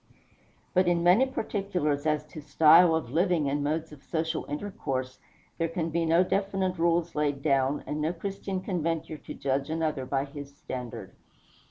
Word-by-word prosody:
But 185 Hz, -1 st, +3 dB
in 170 Hz, -1 st, +2 dB
many 190 Hz, +10 st, +5 dB
particulars 180 Hz, -, -1 dB
as 150 Hz, -1 st, +1 dB
to 155 Hz, -, -8 dB
style 160 Hz, +3 st, +6 dB
of 145 Hz, -7 st, -3 dB
living 170 Hz, -1 st, +2 dB
and 145 Hz, +1 st, 0 dB
modes 155 Hz, +2 st, -2 dB
of 150 Hz, -2 st, -13 dB
social 160 Hz, +1 st, -2 dB
intercourse, 135 Hz, -6 st, -4 dB, 0.4 s
there 165 Hz, -, +1 dB
can 165 Hz, 0 st, -3 dB
be 165 Hz, +1 st, 0 dB
no 165 Hz, +3 st, +5 dB
definite 190 Hz, -1 st, -1 dB
rules 170 Hz, 0 st, +2 dB
laid 145 Hz, -2 st, -1 dB
down, 135 Hz, -1 st, +1 dB
and 150 Hz, +1 st, -3 dB
no 155 Hz, +2 st, +1 dB
Christian 195 Hz, +1 st, -4 dB
can 185 Hz, -2 st, -2 dB
venture 160 Hz, -1 st, -2 dB
to -, -, -8 dB
judge 135 Hz, +1 st, -1 dB
another 155 Hz, -5 st, -1 dB
by 135 Hz, +1 st, 0 dB
his 140 Hz, 0 st, -10 dB
standard. 125 Hz, -2 st, -7 dB
160 Hz, 170 wpm, -28 LUFS, 145-175 Hz, 0.4 s, style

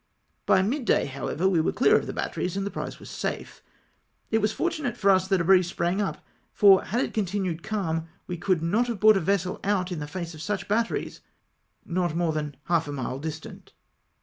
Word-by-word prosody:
By 190 Hz, -, +5 dB
mid 250 Hz, +6 st, -1 dB
day, -, -, +3 dB
however, 140 Hz, +6 st, -2 dB
we 180 Hz, -4 st, +3 dB
were -, -, +1 dB
clear -, -, +4 dB
of -, -, +1 dB
the -, -, -3 dB
batteries, 180 Hz, -, -3 dB
with 195 Hz, -, -1 dB
the 200 Hz, -, -3 dB
prize -, -, -5 dB
safe. -, -, -5 dB, 0.7 s
It 225 Hz, -, +3 dB
was 215 Hz, 0 st, +1 dB
fortunate 310 Hz, -3 st, -2 dB
for 195 Hz, -, +4 dB
us 190 Hz, -1 st, +3 dB
that 190 Hz, -1 st, +2 dB
a -, -, +1 dB
breeze 185 Hz, 0 st, +5 dB
sprang 175 Hz, +3 st, -1 dB
up, 200 Hz, -, -4 dB, 0.3 s
for 195 Hz, -2 st, +6 dB
had 235 Hz, +5 st, 0 dB
it -, -, -2 dB
continued 190 Hz, -5 st, -1 dB
calm, 165 Hz, -7 st, -2 dB, 0.2 s
we 180 Hz, -, -4 dB
could 180 Hz, -2 st, 0 dB
not 215 Hz, +9 st, +1 dB
have 235 Hz, -4 st, -3 dB
brought 215 Hz, +1 st, +6 dB
a -, -, +2 dB
vessel 185 Hz, +1 st, 0 dB
out 190 Hz, -2 st, 0 dB
in 175 Hz, -, -3 dB
the 150 Hz, -, -5 dB
face 170 Hz, +2 st, -5 dB
of 155 Hz, -, -10 dB
such 205 Hz, +1 st, -3 dB
batteries, 225 Hz, +3 st, -1 dB, 0.6 s
not 175 Hz, -2 st, -1 dB
more 170 Hz, -2 st, +1 dB
than 150 Hz, -2 st, -3 dB
half 165 Hz, -1 st, +1 dB
a -, -, -4 dB
mile 135 Hz, -1 st, -4 dB
distant. 160 Hz, +1 st, -8 dB
185 Hz, 210 wpm, -26 LUFS, 165-205 Hz, 0.7 s, for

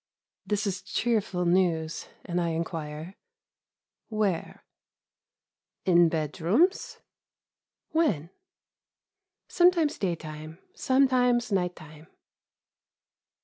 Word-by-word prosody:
This 210 Hz, 0 st, 0 dB
is 195 Hz, -2 st, -2 dB
cheerful 215 Hz, -6 st, -1 dB
news, 170 Hz, -3 st, +1 dB, 0.2 s
and 175 Hz, -1 st, -1 dB
I 170 Hz, -, 0 dB
inquire: 160 Hz, 0 st, -5 dB, 1.0 s
"Where?" 210 Hz, -6 st, -2 dB, 1.2 s
"In 175 Hz, -2 st, +5 dB
bedrooms." 170 Hz, -, +1 dB, 0.9 s
"When?" 195 Hz, -, +1 dB, 1.2 s
"Sometimes 345 Hz, -4 st, +3 dB
daytime, 155 Hz, -3 st, -4 dB, 0.2 s
sometimes 250 Hz, -3 st, +2 dB
night 180 Hz, -2 st, 0 dB
time." 155 Hz, 0 st, -14 dB
180 Hz, 70 wpm, -27 LUFS, 160-235 Hz, 1.2 s, In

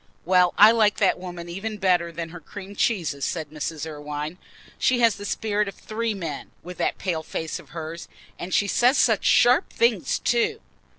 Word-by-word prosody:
"Well, 180 Hz, 0 st, +4 dB
I 210 Hz, +2 st, +9 dB
like 215 Hz, -3 st, +3 dB
that -, -, +2 dB
woman 175 Hz, -2 st, -7 dB
even 200 Hz, +5 st, -5 dB
better 180 Hz, -3 st, +2 dB
than 165 Hz, 0 st, -5 dB
her 175 Hz, +1 st, -9 dB
cream 195 Hz, +5 st, -10 dB
cheeses," 165 Hz, -12 st, 0 dB
said 155 Hz, -1 st, -3 dB
Mrs. 155 Hz, 0 st, -4 dB
Irwine. 150 Hz, +2 st, -6 dB, 0.4 s
"She 255 Hz, -, +3 dB
has 230 Hz, -2 st, +5 dB
the 205 Hz, -, -7 dB
spirit 210 Hz, 0 st, -1 dB
of 195 Hz, -, -6 dB
three 220 Hz, 0 st, -3 dB
men, 165 Hz, -7 st, -6 dB
with 180 Hz, +1 st, -9 dB
that -, -, 0 dB
pale 175 Hz, -4 st, -2 dB
face 160 Hz, 0 st, -5 dB
of -, -, -16 dB
hers. 165 Hz, 0 st, -7 dB, 0.3 s
And 175 Hz, -, -6 dB
she 205 Hz, -, +3 dB
says 250 Hz, +6 st, +3 dB
such 225 Hz, -5 st, +3 dB
sharp 250 Hz, +8 st, +4 dB
things 470 Hz, -, +1 dB
too." 445 Hz, -2 st, 0 dB
180 Hz, 185 wpm, -24 LUFS, 165-215 Hz, 0.4 s, I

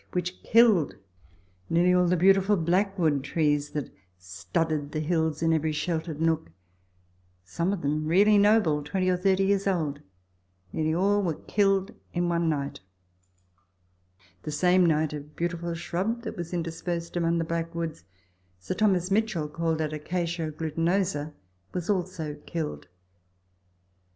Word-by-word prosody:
which 180 Hz, 0 st, -3 dB
killed 220 Hz, -9 st, +4 dB, 0.7 s
nearly 175 Hz, +2 st, +3 dB
all 180 Hz, 0 st, +4 dB
the 180 Hz, +1 st, +2 dB
beautiful 195 Hz, +3 st, +4 dB
blackwood 175 Hz, -4 st, +1 dB
trees 145 Hz, 0 st, 0 dB
that 145 Hz, -1 st, -4 dB, 0.3 s
studded 145 Hz, -, -3 dB
the 155 Hz, -, -1 dB
hills 160 Hz, -1 st, 0 dB
in 165 Hz, 0 st, +3 dB
every 160 Hz, 0 st, +1 dB
sheltered 160 Hz, 0 st, -3 dB
nook 160 Hz, -, 0 dB, 0.9 s
some 170 Hz, -, -2 dB
of 200 Hz, -6 st, -3 dB
them 155 Hz, +2 st, -1 dB
really 200 Hz, +6 st, +5 dB
noble, 205 Hz, -7 st, +4 dB
20 185 Hz, +6 st, -1 dB
or -, -, +2 dB
30 190 Hz, +1 st, +2 dB
years 200 Hz, 0 st, +1 dB
old; 155 Hz, -7 st, -1 dB, 0.7 s
nearly 155 Hz, 0 st, 0 dB
all 200 Hz, +5 st, +2 dB
were 170 Hz, -5 st, -1 dB
killed 195 Hz, +2 st, +1 dB, 0.2 s
in 175 Hz, 0 st, +1 dB
one 170 Hz, -1 st, +1 dB
night; 140 Hz, -2 st, -2 dB, 1.6 s
the -, -, -6 dB
same 180 Hz, +4 st, +3 dB
night 155 Hz, -1 st, +1 dB
a 150 Hz, -, -3 dB
beautiful 170 Hz, +3 st, -4 dB
shrub 195 Hz, +8 st, -2 dB
that 220 Hz, -, -5 dB
was 170 Hz, -1 st, -6 dB
interspersed 170 Hz, 0 st, -4 dB
among 170 Hz, -1 st, +1 dB
the 165 Hz, -, 0 dB
blackwoods 165 Hz, -, -3 dB, 0.5 s
(Sir 95 Hz, -, -4 dB
Thomas 185 Hz, -2 st, +1 dB
Mitchell 200 Hz, -7 st, +1 dB
called 160 Hz, +1 st, -1 dB
it 155 Hz, -1 st, -2 dB
acacia 170 Hz, +1 st, -2 dB
glutinosa) 165 Hz, 0 st, -1 dB, 0.4 s
was 180 Hz, +2 st, -1 dB
also 170 Hz, -6 st, -3 dB
killed. 160 Hz, -3 st, -4 dB
170 Hz, 135 wpm, -27 LUFS, 155-185 Hz, 1.6 s, really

